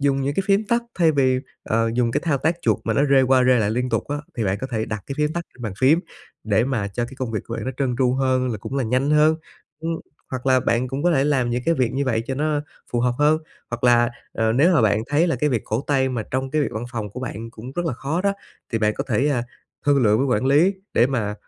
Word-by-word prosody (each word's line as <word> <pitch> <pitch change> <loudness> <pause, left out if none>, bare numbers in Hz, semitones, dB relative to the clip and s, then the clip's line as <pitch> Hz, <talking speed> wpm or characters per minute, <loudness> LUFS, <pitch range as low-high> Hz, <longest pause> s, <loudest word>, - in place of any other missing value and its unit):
dùng 140 -1 +2
những 140 +1 -1
cái 195 - +1
phim 200 +2 +3
tắt 235 +3 +1 0.2
thay 165 -3 +4
vì, 130 -3 +2 0.2
ờ, 115 +1 +1
dùng 120 -1 +2
cái - - 0
thao 150 -5 +1
tác 160 +5 +1
chuột - - +2
mà - - 0
nó 140 - +3
rê 135 -1 +6
qua 130 0 +4
rê 125 -1 +4
lại 105 -2 +1
liên 125 +3 -1
tục 115 -3 -1
á, 145 - -1 0.2
thì 115 - -1
bạn 95 0 0
có - - -3
thể 110 -2 -1
đặt 110 -2 -5
cái 135 - -4
phím 150 0 +1
tắt 170 0 -3
trên 125 - -13
bàn 110 -4 -3
phím 140 +7 +4 0.4
để 110 +1 +2
mà 120 -7 -1
cho 120 +4 -2
cái 125 +3 -9
công 130 -3 -3
việc 110 - -2
của 115 - -5
bạn - - -4
nó 130 - -2
trơn 130 -3 0
tru 125 -2 +3
hơn, 130 -1 +1
là 110 - -4
cũng 130 - -5
là 135 - 0
nhanh 130 +5 +1
hơn. 150 +1 +4 0.4
Ưm, 165 +1 -3 0.4
hoặc 130 0 -5
là 130 -1 +4
bạn 120 +2 0
cũng 135 +2 -3
có 175 - +3
thể 135 -3 +2
làm 135 -5 +1
những 120 +1 -1
cái 165 - +3
việc 125 -6 0
như 140 +2 -1
vậy 115 -4 0
cho 135 - -2
nó 150 +1 0 0.3
phù 120 - +1
hợp 125 0 +1
hơn, 150 +1 +4 0.3
hoặc 120 +1 -4
là, 120 0 +5 0.2
ờ, 110 0 +1
nếu 155 +9 +4
mà 160 - +4
bạn 110 0 +2
thấy 145 +5 +2
là 165 - 0
cái 150 -1 +1
việc 120 -4 0
cổ 110 +3 -1
tay 135 -2 +2
mà 125 -4 -2
trong 130 +1 -2
cái 155 +2 +1
việc - - 0
văn 110 +2 -4
phòng 110 -4 -4
của 125 - -7
bạn 115 -3 -6
cũng 120 +3 -9
rất 175 +3 -2
là 160 - 0
khó 140 +7 -2
đó, 200 0 +2 0.4
thì 115 - +1
bạn 105 -1 +1
có - - -3
thể, 130 +4 +2
à, 130 -5 +1 0.4
thương 140 -2 +4
lượng 105 -1 +4
với 135 - +1
quản 130 0 +1
lý 155 +8 +4 0.2
để 120 - +5
mà, 115 -6 -2
130 Hz, 295 wpm, -22 LUFS, 115-145 Hz, 0.4 s, rê